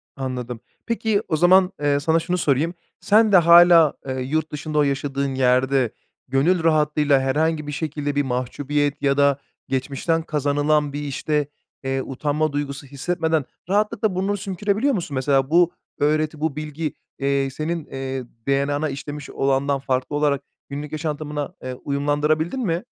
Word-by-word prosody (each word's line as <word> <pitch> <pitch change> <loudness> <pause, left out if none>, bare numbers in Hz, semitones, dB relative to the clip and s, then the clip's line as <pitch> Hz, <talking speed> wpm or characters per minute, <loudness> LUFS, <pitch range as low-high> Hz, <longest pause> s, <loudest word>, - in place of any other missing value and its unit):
Anladım. 125 -3 -4 0.3
Peki 220 -3 0
o 160 - 0
zaman, 185 +2 +5
eee, 145 -1 +2
sana 160 +3 +2
şunu 180 +2 -1
sorayım. 155 +2 +1 0.3
Sen 215 +1 +4
de 190 - +8
hâlâ, 170 -2 +7
eee, 130 0 -3
yurt 155 +4 -1
dışında 150 +1 -4
o 150 - +5
yaşadığın 140 -1 -1
yerde 130 -1 +2 0.4
gönül 160 +7 +2
rahatlığıyla 150 -3 +3
herhangi 150 +3 0
bir 145 - -3
şekilde 145 -1 -3
bir 145 - +2
mahcubiyet 145 +3 -1
ya 140 -1 +2
da 140 -1 +4 0.3
geçmişten 140 +5 -1
kazanılan 145 -1 +1
bir, 145 - -3
işte, 145 +1 -1 0.4
eee, 135 0 -1
utanma 150 +3 -1
duygusu 140 -1 -4
hissetmeden 160 +1 -1 0.2
rahatlıkla 210 0 +1
burnunu 195 +2 0
sümkürebiliyor 205 +8 0
musun? 170 - -3
Mesela 135 +1 +1
bu 175 +1 +4 0.3
öğreti, 155 +1 +1
bu 155 -3 -1
bilgi, 155 +1 -4 0.3
eee, 140 0 +1
senin, 155 +3 -3
eee, 135 -1 -5 0.2
DNA'na 145 +2 +1
işlemiş 145 +1 -7
olandan 135 +1 0
farklı 130 +1 -2
olarak 145 -2 +1 0.3
günlük 145 +1 -6
yaşantımına, 150 0 -4
eee, 130 0 -4
uyumlandırabildin 145 - 0
mi? 170 +2 -1
145 Hz, 145 wpm, -22 LUFS, 140-160 Hz, 0.4 s, de